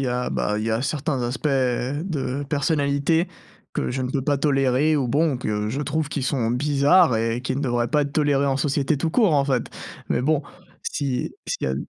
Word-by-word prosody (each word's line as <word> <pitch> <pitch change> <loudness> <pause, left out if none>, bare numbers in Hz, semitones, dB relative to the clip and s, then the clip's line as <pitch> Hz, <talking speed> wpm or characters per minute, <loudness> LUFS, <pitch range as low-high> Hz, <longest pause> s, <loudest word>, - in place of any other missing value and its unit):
y - - 0
a, 125 0 -1
bah, 105 0 -1
il 110 - -2
y 115 - -1
a 110 +1 0
certains 140 0 -1
aspects 125 +5 -2
de 135 +2 -1
personnalité 145 +3 +1 0.5
que - - -1
je 130 +1 -2
ne 125 - -2
peux 135 0 -1
pas 145 +1 +1
tolérer 140 +1 +2
ou 135 -3 0
bon 150 +2 +2
que 105 -3 -2
je 135 +6 -2
trouve 155 0 -1
qui 145 -2 -3
sont 125 -4 0
bizarres 145 +4 +4
et 115 +1 -1
qui 130 - -2
ne - - -2
devraient 120 -3 0
pas 150 -1 +2
être 140 -1 -4
tolérés 145 -2 +2
en 135 -1 +1
société 140 +1 0
tout 160 +4 -1
court 200 -3 +3
en 140 -1 +3
fait. 130 -3 0 0.4
Mais - - 0
bon, 150 +2 +2 0.4
si 135 -4 -2
s'il - - -3
y - - -1
a - - -1
140 Hz, 215 wpm, -23 LUFS, 125-150 Hz, 0.5 s, bizarres